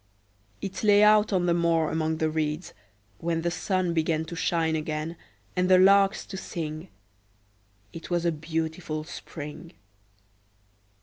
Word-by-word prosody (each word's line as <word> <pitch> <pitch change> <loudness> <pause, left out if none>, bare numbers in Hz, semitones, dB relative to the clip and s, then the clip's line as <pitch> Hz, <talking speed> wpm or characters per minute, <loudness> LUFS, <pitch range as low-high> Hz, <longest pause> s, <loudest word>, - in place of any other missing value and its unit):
It 195 +2 -5
lay 205 -1 +6
out 210 0 +5
on 185 -3 +1
the 175 - +3
moor 165 -2 +2
among 160 0 -1
the 160 - +1
reeds, 155 +2 -2 0.5
when 165 -1 -1
the 170 - 0
sun 185 -1 -1
began 160 -1 0
to 170 - -7
shine 165 -2 0
again 155 +1 -3 0.4
and 180 0 +1
the 185 - +7
larks 195 +1 +5
to 190 - -7
sing: 160 -2 -5 1.1
it 165 - -9
was 175 -1 0
a 170 - +3
beautiful 160 0 -3
spring. 155 +1 -9
165 Hz, 140 wpm, -27 LUFS, 160-180 Hz, 1.1 s, the